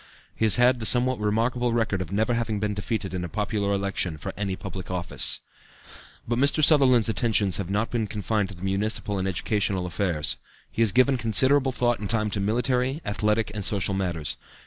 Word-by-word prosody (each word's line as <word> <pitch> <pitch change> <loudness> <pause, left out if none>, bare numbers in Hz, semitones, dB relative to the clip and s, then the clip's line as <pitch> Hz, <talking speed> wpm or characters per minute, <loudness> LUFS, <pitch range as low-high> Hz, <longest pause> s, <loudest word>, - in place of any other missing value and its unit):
He 110 - 0
has 105 - +7
had 125 +1 +3
the 110 - +2
somewhat 125 0 +3
remarkable 115 +3 0
record 110 -5 0
of 90 -1 -6
never 110 +4 0
having 115 -3 -2
been 105 0 -1
defeated 100 -1 -4
in 90 -1 -3
a 85 - -5
popular 105 0 -2
election 100 -4 -2
for 75 - -6
any 100 -2 -3
public 95 0 -8
office. 90 -2 -1 0.9
But 120 +1 -1
Mr. 140 +3 +3
Sutherland's 130 -7 +6
attentions 110 -4 +1
have 95 -3 -4
not 105 +3 -1
been 115 -3 -1
confined 105 -1 -2
to 95 - -10
municipal 100 +1 0
and 95 - -2
educational 95 0 -1
affairs. 85 -5 -1 0.3
He 115 - -3
has 110 -3 +5
given 130 +4 +3
considerable 130 +4 +3
thought 120 -1 0
and 105 - -5
time 110 -2 +1
to 100 - -2
military, 125 +6 0
athletic 105 +1 0
and 105 -2 -4
social 100 0 0
matters. 90 -6 -3
105 Hz, 190 wpm, -25 LUFS, 95-120 Hz, 0.9 s, has